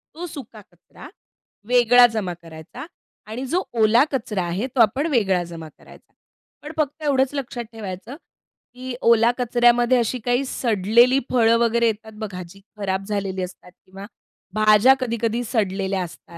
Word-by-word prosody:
तो 345 - -6
सुका 255 -8 -10
कचरा 175 - -15 0.6
वेगळा 245 0 +6
जमा 210 -6 -4
करायचा 165 - -11 0.4
आणि 230 +5 -6
जो 360 +7 0 0.2
ओला 230 +5 +5
कचरा 210 -8 -2
आहे, 175 +7 -3
तो 260 -1 -3
आपण 260 +8 +3
वेगळा 195 -9 +1
जमा 165 -2 -9
करायचा. - - -18 0.5
पण 300 - -8
फक्त 305 0 -2
एवढंच 275 -1 +1
लक्षात 250 -3 -5
ठेवायचं, 215 +3 -8 0.6
की 255 0 -7
ओला 230 0 +4
कचऱ्यामध्ये 240 0 +3
अशी 240 +2 -1
काही 245 +2 +1
सडलेली 235 +3 +2
फळं 230 -2 +4
वगैरे 235 0 +2
येतात 220 0 -3
बघा 195 -4 -6
जी 195 +3 -16 0.2
खराब 195 -1 -3
झालेली 195 -2 -3
असतात 180 0 -9
किंवा 195 +1 -11 0.5
भाज्या 215 +4 +5
कधी-कधी 235 -1 -2
सडलेल्या 195 -4 -1
असतात. 170 - -12
230 Hz, 145 wpm, -22 LUFS, 195-250 Hz, 0.6 s, वेगळा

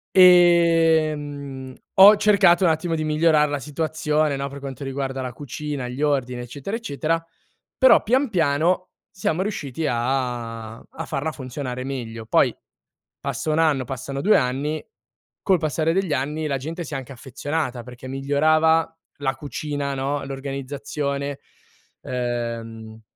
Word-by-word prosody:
Ehm, 160 -6 +4 0.2
ho 200 +2 +9
cercato 190 -4 +4
un - - +5
attimo 165 +1 0
di 155 -1 -2
migliorar 155 0 +3
la 145 0 -2
situazione, 150 +1 -1
no, 140 0 -3
per 140 +1 -9
quanto 135 0 -7
riguarda 135 -1 -3
la 125 - -4
cucina, 145 -1 -5
gli 125 +3 -6
ordini 130 -4 0
eccetera, 140 - -5
eccetera, 165 -6 -2 0.5
però 260 - +6
pian 260 +4 +2
piano 175 +1 +1 0.2
siamo 185 -2 -1
riusciti 160 - -3
a 120 -3 -2
a - - -9
farla 145 +3 -2
funzionare 130 -2 -5
meglio. 115 -4 -5
Poi, - - +3 0.7
passa 155 - -2
1 155 - +1
anno, 145 -5 +2
passano 135 +2 -5
2 210 +6 +4
anni, 140 +4 -1 0.6
col 185 -4 +3
passare 155 +1 0
degli 190 -3 0
anni 150 +4 -2
la 140 -2 0
gente 160 +6 -5
si 155 - -8
è - - -1
anche 135 +1 -8
affezionata 130 0 -4
perché 125 +1 -11
migliorava 155 +4 +2 0.3
la 135 -2 -1
cucina, 145 -1 -4
no, 140 +2 -2
l'organizzazione, 140 +1 -4 0.6
ehm 115 -2 -4
145 Hz, 135 wpm, -23 LUFS, 130-160 Hz, 0.7 s, ho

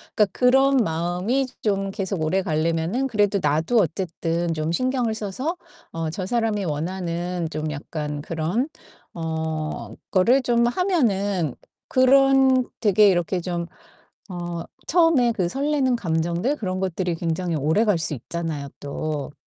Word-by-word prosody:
그러니까 210 - +5
그런 270 +2 +4
마음이 180 +7 0 0.2
좀 195 -2 0
계속 195 -3 -3
오래 190 +4 +1
가려면은 165 +9 0
그래도 205 -4 +2
나도 160 +10 +2
어쨌든 170 -1 -1
좀 155 +1 -2
신경을 250 +1 0
써서 255 - -3 0.3
어 165 -1 -3
저 185 +2 -4
사람이 220 -4 0
원하는 175 +2 -2
좀 155 -1 -3
약간 150 0 -5
그런 170 - -1 0.5
어 160 -7 -3 0.2
거를 240 +8 +4
좀 235 0 +3
하면은 205 - +1 0.3
그런 265 0 +5
되게 210 -1 +5
이렇게 175 0 0
좀 175 -1 -3 0.7
어 175 -1 -4 0.2
처음에 320 -8 +4
그 185 -5 -1
설레는 275 0 +1
감정들 175 - 0
그런 185 -6 -3
것들이 180 -2 -1
굉장히 170 0 -1
오래갈 170 +7 +2
수 160 -2 -2
있잖아요 150 +1 -4
또. 145 0 -4
185 Hz, 270 characters per minute, -23 LUFS, 165-235 Hz, 0.7 s, 그러니까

